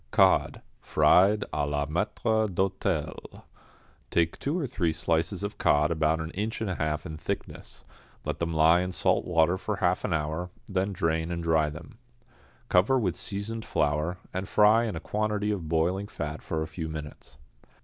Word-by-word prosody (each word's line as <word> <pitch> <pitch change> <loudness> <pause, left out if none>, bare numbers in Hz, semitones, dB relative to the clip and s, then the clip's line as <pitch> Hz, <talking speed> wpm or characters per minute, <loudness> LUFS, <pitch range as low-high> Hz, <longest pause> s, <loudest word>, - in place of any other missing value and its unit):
=Cod, - - +3 0.2
Fried 100 +3 +4
à 75 -1 0
la 75 0 0
Maître 105 +7 0
d'Hôtel.= 95 +1 -2 0.7
Take 85 -1 +1
two 145 +5 -1
or 165 - -1
three 90 -10 0
slices 85 +5 -1
of 100 - -5
cod 75 +2 +3
about 80 0 +1
an 80 0 -4
inch 105 +5 -3
and 110 -4 -2
a - - -1
half 75 -2 -2
in 80 -1 -6
thickness, - - -6 0.4
let - - -3
them 85 0 -1
lie 80 +2 +5
in 90 0 -2
salt - - +1
water 85 +1 +2
for 105 +2 -2
half 90 -2 +1
an 105 - -2
hour, 80 +2 -2 0.2
then 95 +1 -1
drain 80 -2 -1
and 85 -1 -3
dry 80 -2 +2
them. 110 - -11 0.7
Cover 100 +9 +4
with 100 -9 0
seasoned 110 +3 -4
flour, 75 +3 0 0.2
and 95 +1 -4
fry 110 +3 +5
in 105 -6 -3
a - - -3
quantity 105 +2 -1
of 90 -7 -4
boiling 90 +5 +1
fat 75 -6 -5
for 80 -1 -2
a - - -5
few 80 -1 -5
minutes. 75 -3 -8
85 Hz, 175 wpm, -28 LUFS, 80-105 Hz, 0.7 s, lie